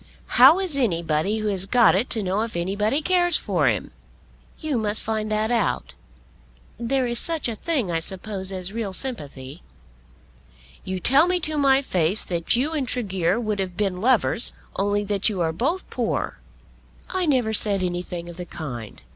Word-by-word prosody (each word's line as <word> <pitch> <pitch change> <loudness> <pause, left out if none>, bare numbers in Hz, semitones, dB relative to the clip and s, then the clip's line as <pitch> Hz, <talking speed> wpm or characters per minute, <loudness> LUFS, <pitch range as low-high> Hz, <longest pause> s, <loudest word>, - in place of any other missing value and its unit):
"How 275 +7 +9
is 365 -7 0
anybody 170 - 0
who 215 -1 -2
has 195 -1 +1
got 240 0 +5
it 205 +7 0
to 220 -2 +1
know 190 +3 0
if 225 -5 -3
anybody 210 - 0
cares 350 0 +3
for - - 0
him?" - - -1 0.7
"You 300 -6 -1
must 215 0 +3
find 215 -1 -2
that 215 +2 0
out. 230 -6 -1 0.9
There 255 +2 0
is 240 -1 +1
such 325 -5 -1
a 230 - -3
thing 255 - -2
I 165 - 0
suppose 190 +2 -4
as 185 +1 -5
real 220 -4 -4
sympathy." 145 - -6 1.2
"You 185 0 -4
tell 275 - +4
me 360 0 +1
to 310 0 -2
my 275 -1 +3
face 180 - +3
that 170 +4 0
you 270 +6 0
and 285 -5 -2
Tregear 190 -5 0
would 215 -3 -2
have 185 -2 -4
been 195 -3 -1
lovers 240 0 +3 0.2
only 205 +1 0
that 205 +1 0
you 200 -4 -4
are 160 -1 0
both 285 - -2
poor." - - -2 0.7
"I 370 -2 -1
never 250 -6 +1
said 200 -3 +2
anything 175 -1 -4
of 175 0 -10
the 180 - -6
kind." 120 - -8
215 Hz, 175 wpm, -23 LUFS, 185-255 Hz, 1.2 s, How